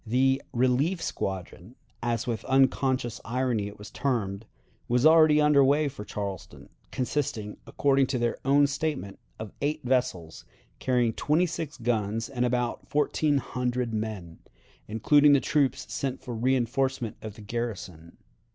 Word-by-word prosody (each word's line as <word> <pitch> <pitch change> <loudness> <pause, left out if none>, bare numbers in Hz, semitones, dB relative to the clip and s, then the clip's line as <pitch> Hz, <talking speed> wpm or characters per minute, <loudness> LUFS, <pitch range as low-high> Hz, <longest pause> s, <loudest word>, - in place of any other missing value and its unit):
The 130 +3 +2
"relief 130 +9 +1
squadron," 95 - -5 0.3
as 115 -2 -1
with 115 -3 -3
unconscious 130 -2 +1
irony 120 -3 -1
it 105 - -10
was 105 +1 -11
termed, 110 -6 -2 0.4
was 125 +3 +2
already 155 -1 +6
under 150 -2 +5
way 145 +3 +3
for 135 -6 -9
Charleston, 100 -2 -7 0.2
consisting, 120 -5 -3
according 135 -1 +2
to 130 - -1
their 120 -1 0
own 140 +2 +4
statement, 140 -7 -3 0.2
of 110 -2 -7
eight 150 +2 -1
vessels, 120 -11 -1 0.4
carrying 125 -3 +1
twenty 155 +9 +2
six 160 -3 -5
guns 115 -2 -1
and 125 -3 -1
about 125 -1 -1
fourteen 150 0 +1
hundred 125 -2 -2
men, 105 -6 -5 0.5
including 145 +7 +4
the 140 - +5
troops 140 -1 0
sent 135 -1 -2
for 120 -2 -7
reënforcement 130 0 0
of 110 -2 -8
the 110 - -12
garrison. 100 -7 -6
125 Hz, 140 wpm, -27 LUFS, 110-140 Hz, 0.5 s, already